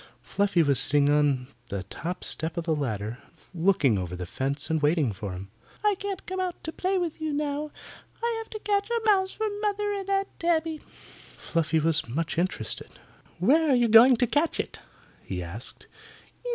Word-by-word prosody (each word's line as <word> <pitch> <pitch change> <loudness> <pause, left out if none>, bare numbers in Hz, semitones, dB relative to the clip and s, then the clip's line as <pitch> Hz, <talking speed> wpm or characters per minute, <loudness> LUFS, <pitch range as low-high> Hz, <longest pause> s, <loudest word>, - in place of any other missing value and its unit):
Fluffy 200 -4 +2
was 140 -4 +3
sitting 145 +1 +3
on 145 -3 +2 0.2
the 100 -2 -3
top 170 - -5
step 160 +2 -3
of 170 - -2
the 160 -2 +1
ladder, 115 -4 -3 0.3
looking 165 - +3
over 90 -1 -4
the 90 0 -5
fence 135 - -3
and 160 -1 +1
waiting 150 - +2
for 100 0 -5
him. 95 +2 -8 0.3
"I 420 - +5
can't 400 0 -5
come 375 +1 -4
out 365 -2 -3
to 320 - -4
play 375 +3 0
with 340 -3 -2
you 315 -1 -1
now. 295 0 -2 0.5
I 470 0 +1
have 450 - -8
to 430 - -6
catch 405 0 0
a 470 0 +1
mouse 385 -3 +3
for 440 - -2 0.2
Mother 415 -1 0
and 395 -1 -4
Aunt 390 0 -1
Tabby." 325 -2 +1
Fluffy 165 - -3
was 155 -5 +1
much 165 +6 -1
interested. 185 +2 -3 0.4
"Where 315 +3 +4
are 270 - +5
you 240 -1 +4
going 230 +3 +8
to 245 - +3
catch 295 +7 +1
it?" - - -3 0.4
he 90 -2 -4
asked. 95 +8 -6
185 Hz, 185 wpm, -27 LUFS, -, 0.5 s, going